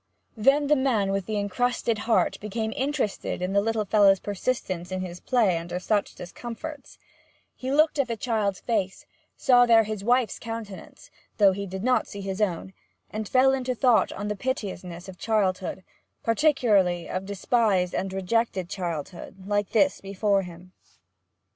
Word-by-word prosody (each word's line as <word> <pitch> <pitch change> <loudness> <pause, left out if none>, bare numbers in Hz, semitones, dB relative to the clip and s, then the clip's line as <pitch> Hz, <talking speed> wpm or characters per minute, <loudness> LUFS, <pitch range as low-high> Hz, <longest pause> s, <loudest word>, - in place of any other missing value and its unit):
Then 275 +6 +3
the 300 +1 +4
man 235 -8 +1
with 195 -1 -2
the 215 -1 -2
encrusted 225 +2 0
heart 225 - +2
became 220 +1 -3
interested 270 -6 -2
in 180 +2 -2
the 200 - +4
little 220 0 -1
fellow's 195 -1 +5
persistence 190 -4 -3
in 185 0 -2
his 180 -1 -6
play 215 -9 +2
under 175 +1 -5
such 205 +2 -1
discomforts; 240 - -8 0.6
he 260 +1 -4
looked 305 +1 +3
in 275 - +3
the 230 -1 -3
child's 210 -4 -1
face, 200 -5 -2 0.3
saw 245 -1 +5
there 225 -1 +6
his 215 -2 -5
wife's 240 -1 +1
countenance, 225 -4 -8 0.3
though 200 -2 +6
he 200 +1 -4
did 190 +1 -6
not 255 +1 +2
see 200 - -8
his 195 +1 -4
own, 190 -1 -1 0.4
and 215 -1 -4
fell 265 +1 +4
into 255 -1 -1
thought 245 -1 +3
on 205 +1 -5
the 210 - -2
piteousness 190 -7 -4
of 185 -1 -11
childhood 190 -4 -1 0.4
particularly 220 - +2
of 185 +1 -4
despised 200 -2 +1
and 190 0 -2
rejected 190 -1 -1
childhood, 180 0 -6
like 205 0 0
this 280 +5 +2
before 200 0 +1
him. 180 0 -11
205 Hz, 160 wpm, -26 LUFS, 190-235 Hz, 0.6 s, there